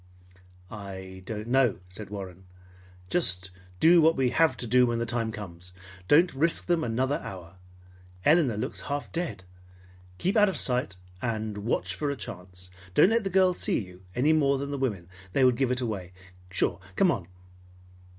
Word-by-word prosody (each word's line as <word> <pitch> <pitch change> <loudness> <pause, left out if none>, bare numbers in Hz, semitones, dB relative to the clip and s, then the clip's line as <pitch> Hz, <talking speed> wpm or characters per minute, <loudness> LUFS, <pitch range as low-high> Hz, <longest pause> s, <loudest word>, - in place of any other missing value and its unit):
"I 95 -2 -8
don't 110 0 -5
know," 130 -2 +3
said 95 +3 -8
Warren. 95 -2 -8 0.7
"Just 95 - +1 0.3
do 170 +1 +6
what 160 +1 +5
we 130 -2 +1
have 165 +4 +3
to - - -5
do 125 +2 +4
when 120 0 0
the 115 - -1
time 115 -1 -1
comes. 90 -4 -9 0.3
Don't 170 +5 +5
risk 165 +5 +1
them 170 -2 +1
another 130 +4 0
hour. 90 -1 -9 0.7
Elinor 150 -8 +4
looks 110 - -4
half 145 0 -3
dead. 170 - -3 0.7
Keep 190 - 0
out 210 -1 +6
of 190 - -4
sight 125 -7 +1 0.3
and 110 -3 -3
watch 105 +4 -1
for 150 - -2
a 140 - -1
chance. 90 -5 -8 0.2
Don't - - +6
let 230 0 +2
the 195 - -2
girls 185 -1 +3
see - - +1
you, 90 -3 -7
any 145 +6 +3
more 140 -3 +3
than 140 +1 -4
the 140 - -2
women. 105 -10 -2 0.3
They 135 - +4
would 125 -1 +4
give 135 0 +1
it 125 0 0
away, 100 -7 -4 0.4
sure. 90 -1 0 0.2
Come 185 - +4
on!" 95 - -4
120 Hz, 175 wpm, -27 LUFS, 95-145 Hz, 0.7 s, do